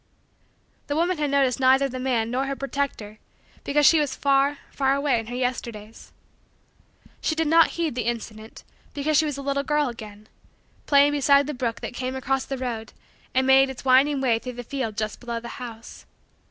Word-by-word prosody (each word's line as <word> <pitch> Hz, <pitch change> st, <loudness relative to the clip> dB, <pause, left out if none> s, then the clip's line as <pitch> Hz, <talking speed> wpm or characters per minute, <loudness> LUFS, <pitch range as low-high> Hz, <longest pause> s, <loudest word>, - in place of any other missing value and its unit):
The 285 Hz, -, -2 dB
woman 345 Hz, +1 st, 0 dB
had 295 Hz, -1 st, 0 dB
noticed 275 Hz, -3 st, +2 dB
neither 265 Hz, +1 st, +4 dB
the 255 Hz, -1 st, -6 dB
man 240 Hz, -3 st, -1 dB
nor 265 Hz, +2 st, -1 dB
her 275 Hz, -, -2 dB
protector 270 Hz, -6 st, -4 dB, 0.4 s
because 295 Hz, +1 st, +2 dB
she 320 Hz, -, +6 dB
was 290 Hz, -3 st, -1 dB
far, 280 Hz, +1 st, +2 dB
far, 270 Hz, 0 st, +1 dB
away 280 Hz, -4 st, +1 dB
in 225 Hz, -, -7 dB
her 245 Hz, -, -6 dB
Yesterdays. 235 Hz, -4 st, -5 dB, 1.1 s
She 315 Hz, -, 0 dB
did 325 Hz, 0 st, 0 dB
not 330 Hz, +1 st, +6 dB
heed 330 Hz, -4 st, -1 dB
the 245 Hz, -1 st, -3 dB
incident 220 Hz, -2 st, -6 dB, 0.3 s
because 300 Hz, +2 st, 0 dB
she 315 Hz, -, +4 dB
was 295 Hz, -2 st, -3 dB
a 280 Hz, -, -6 dB
little 280 Hz, 0 st, 0 dB
girl 295 Hz, -1 st, 0 dB
again, 215 Hz, -2 st, -11 dB, 0.6 s
playing 285 Hz, 0 st, +5 dB
beside 280 Hz, 0 st, +4 dB
the 300 Hz, -, -4 dB
brook 245 Hz, -3 st, -3 dB
that -, -, -5 dB
came 255 Hz, +1 st, -4 dB
across 265 Hz, 0 st, -1 dB
the 270 Hz, -, -4 dB
road 235 Hz, -3 st, -5 dB, 0.4 s
and 260 Hz, 0 st, +3 dB
made 265 Hz, 0 st, +5 dB
its 265 Hz, 0 st, -9 dB
winding 270 Hz, +2 st, +4 dB
way 235 Hz, -4 st, +2 dB
through 250 Hz, +1 st, -7 dB
the 245 Hz, 0 st, -7 dB
field 235 Hz, -4 st, -4 dB
just 215 Hz, -1 st, -3 dB
below 235 Hz, -1 st, -4 dB
the 235 Hz, -, -9 dB
house. 230 Hz, -2 st, -10 dB
265 Hz, 195 wpm, -24 LUFS, 240-280 Hz, 1.1 s, she